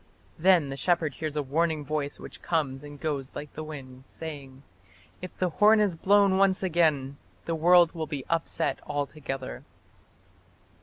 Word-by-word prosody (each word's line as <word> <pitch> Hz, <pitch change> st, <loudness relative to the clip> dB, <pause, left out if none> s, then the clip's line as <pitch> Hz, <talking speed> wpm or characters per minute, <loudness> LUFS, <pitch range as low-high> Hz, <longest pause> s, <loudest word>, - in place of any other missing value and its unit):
Then 175 Hz, -4 st, +4 dB
the 135 Hz, -, -5 dB
shepherd 165 Hz, -2 st, +1 dB
hears 155 Hz, +2 st, -5 dB
a 150 Hz, -, 0 dB
warning 155 Hz, +2 st, 0 dB
voice 145 Hz, -1 st, -3 dB
which -, -, -11 dB
comes 145 Hz, -5 st, -1 dB
and 145 Hz, -1 st, -10 dB
goes 140 Hz, -4 st, -3 dB
like 150 Hz, -1 st, -7 dB
the 155 Hz, -, -6 dB
wind, 135 Hz, -4 st, -10 dB
saying: 140 Hz, -4 st, -9 dB, 0.6 s
"If 185 Hz, -, -8 dB
the 185 Hz, -, +1 dB
horn 210 Hz, +6 st, +5 dB
is 205 Hz, -5 st, +2 dB
blown 195 Hz, +2 st, +4 dB
once 195 Hz, -1 st, +3 dB
again, 155 Hz, -6 st, +1 dB, 0.3 s
the 165 Hz, -, -2 dB
world 170 Hz, +1 st, +5 dB
will 160 Hz, -3 st, -4 dB
be 145 Hz, -4 st, -5 dB
upset 165 Hz, -1 st, -1 dB
altogether". 140 Hz, -, -4 dB
155 Hz, 155 wpm, -27 LUFS, 140-175 Hz, 0.6 s, horn